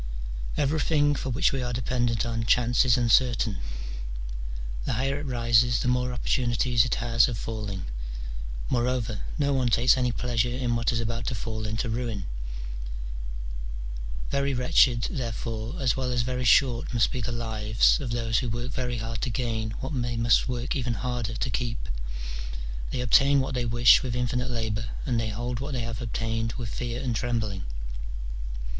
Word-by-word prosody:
Everything 145 0 +3
for 135 - -3
which 125 +1 +3
we 135 - 0
are 120 0 -2
dependent 120 -2 0
on 115 -1 -1
chance 120 +3 +4
is 120 -1 +5
uncertain: 120 -3 +3 1.2
the - - -1
higher 135 +4 0
it 145 - -5
rises, 120 -1 +3
the - - 0
more 125 0 +2
opportunities 120 -1 +2
it 125 - 0
has 115 -1 +3
of 120 -3 -3
falling. 105 - -4 0.8
Moreover, 120 -3 0 0.2
no 140 -2 +2
one 130 -2 +2
takes 120 +3 +5
any 125 -1 +2
pleasure 120 0 0
in 120 -2 0
what 115 +1 +2
is 115 - 0
about 115 +1 -2
to 125 - 0
fall 110 0 -3
into 110 +3 -1
ruin: 115 -4 -2 2.1
very 140 -1 +1
wretched, 125 -1 +4
therefore, 115 0 -3
as 130 -5 +2
well 130 -1 -1
as 120 -1 +1
very 125 0 -2
short 120 0 +4
must 115 - +3
be 130 - -2
the 120 - -2
lives 110 -2 +2
of 135 -5 -3
those 115 -2 +1
who 125 - -2
work 120 +3 -3
very 125 -2 -2
hard 115 0 -4
to 130 - 0
gain 115 -2 -1
what 130 +3 -3
they 120 -1 -2
must 115 +2 +4
work 125 +1 -1
even 125 -3 0
harder 120 +1 -2
to 125 - -1
keep: 115 0 -2 1.0
they 125 - -2
obtain 140 +4 +5
what 135 0 -1
they 125 -1 0
wish 120 +1 +6
with 125 -2 -3
infinite 125 +1 0
labour, 115 -2 -2 0.2
and 120 -3 +1
they 110 -1 -1
hold 120 +3 -3
what 140 +2 -4
they 125 - -1
have 115 +1 -4
obtained 115 0 -1
with 115 -4 -5
fear 120 +1 -3
and 125 -3 0
trembling. 110 -5 -1
120 Hz, 170 wpm, -27 LUFS, 115-125 Hz, 2.1 s, wish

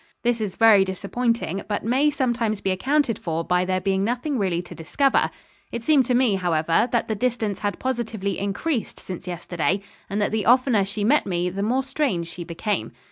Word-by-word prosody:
This 240 -1 +1
is 200 -3 -3
very 220 -4 +6
disappointing, 200 +1 -2
but 205 0 -2
may 265 +6 +3
sometimes 240 -6 0
be 195 - -1
accounted 265 +4 +1
for 165 -1 -2
by 180 +1 +1
there 185 0 0
being 190 0 0
nothing 245 +5 -1
really 180 -3 0
to - - -11
discover. 270 - +1 0.4
It 235 - -4
seemed 285 -1 +4
to 250 0 +1
me, 240 -6 +3
however, 170 +4 +1
that 235 - +1
the 220 - -1
distance 220 -3 -1
had 205 -1 -2
positively 225 -6 -2
increased 220 +7 -2
since 185 0 -8
yesterday, 175 0 -1 0.3
and 205 +1 -2
that 205 - +1
the 215 -1 -1
oftener 245 -4 +4
she 205 +1 -4
met 275 +5 +3
me 180 -1 -1
the 195 +2 -4
more 250 +6 +1
strange 265 - -1
she 175 - -7
became. 170 - -3
210 Hz, 190 wpm, -23 LUFS, 185-245 Hz, 0.4 s, very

